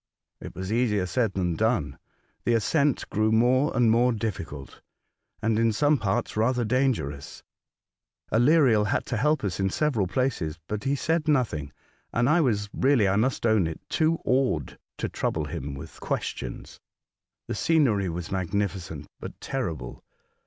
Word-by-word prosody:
It - - -9
was 95 +3 -4
easier 110 -5 +1
said 105 +3 0
than 90 -3 0
done. 105 - 0 0.4
The 120 - +2
ascent 140 +5 +1
grew 110 +1 +2
more 125 +6 +3
and 120 -2 +4
more 120 +2 +4
dijfficult, 90 - -5 0.6
and 110 0 +2
in 115 0 +3
some 145 +6 +2
parts 100 -3 -1
rather 120 +2 +1
dangerous. 110 - -1 0.9
Aleriel 120 -3 +4
had - - 0
to 120 - -2
help 150 +4 +1
us 95 -3 -2
in 95 0 +1
several 120 -5 0
places; 95 - -1
but 105 -1 -4
he 140 +1 +2
said 160 +2 0
nothing, 110 - 0 0.4
and 120 +1 +1
I 160 +5 +4
was 105 -8 +1
really, 130 -6 +3
I 95 - +2
must 120 +4 0
own 110 -6 +3
it, 80 - -6
too 160 0 +2
awed 125 - 0 0.2
to - - -2
trouble - - -2
him 70 +1 -5
with 70 - -10
questions. - - -4 0.7
The - - -4
scenery 125 - +2
was 85 0 -5
magnifi 95 +1 -1
cent, 80 -4 -8
but - - -9
terrible. 80 - -4
110 Hz, 155 wpm, -26 LUFS, 95-130 Hz, 0.9 s, and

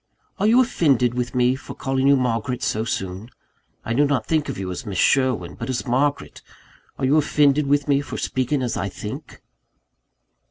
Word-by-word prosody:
"Are 205 - +2
you 235 +3 +5
offended 140 - +2
with 125 0 -3
me 125 +1 +3
for 135 - -10
calling 135 0 0
you 140 - +6
Margaret 125 -1 -1
so 110 - 0
soon? 95 -1 -4 0.6
I 115 - -2
do 140 +5 +3
not 135 -6 0
think 155 +1 0
of - - -4
you 95 -1 -4
as 90 - -5
Miss 100 -5 -5
Sherwin, 125 -7 +2
but 115 - -7
as 130 +1 -2
Margaret 140 +3 -1 0.6
are 135 - -1
you 140 +4 +3
offended 145 -1 +3
with 145 +1 +1
me 140 -1 +3
for - - -7
speaking 130 +1 -1
as 120 - -2
I - - -2
think?" - - -8
130 Hz, 190 wpm, -22 LUFS, 115-145 Hz, 0.6 s, you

